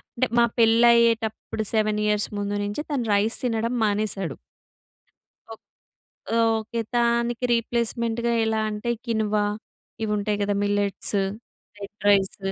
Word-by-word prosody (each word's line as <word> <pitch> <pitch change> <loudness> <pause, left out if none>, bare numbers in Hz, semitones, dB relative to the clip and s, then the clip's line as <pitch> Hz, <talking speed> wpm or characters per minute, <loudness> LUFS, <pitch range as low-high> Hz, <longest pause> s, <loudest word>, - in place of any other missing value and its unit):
అంటే 255 +1 +1
మా 235 - +6
పెళ్లయ్యేటప్పుడు 230 -1 +3
7 215 -1 +1
ఇయర్స్ 210 0 +1
ముందు 205 0 -2
నుంచి 205 +9 -4
తను 255 -5 -1
రైస్ 210 +3 +1
తినడం 230 0 -1
మానేసాడు. 205 -6 -2 1.2
ఓ - - -8 1.0
ఓకే. 230 +2 -4
దానికి 235 0 +1
రీప్లేస్మెంట్‌గా 235 0 -1
ఎలా 220 0 0
అంటే 210 +3 -3
క్వినోవా 215 -3 0 0.6
ఇవుంటాయి 210 -1 -1
గదా! 205 0 0
Millets, 205 0 -1 0.6
red 200 +1 -9
rice. 195 -1 +3
220 Hz, 110 wpm, -24 LUFS, 205-235 Hz, 1.2 s, మా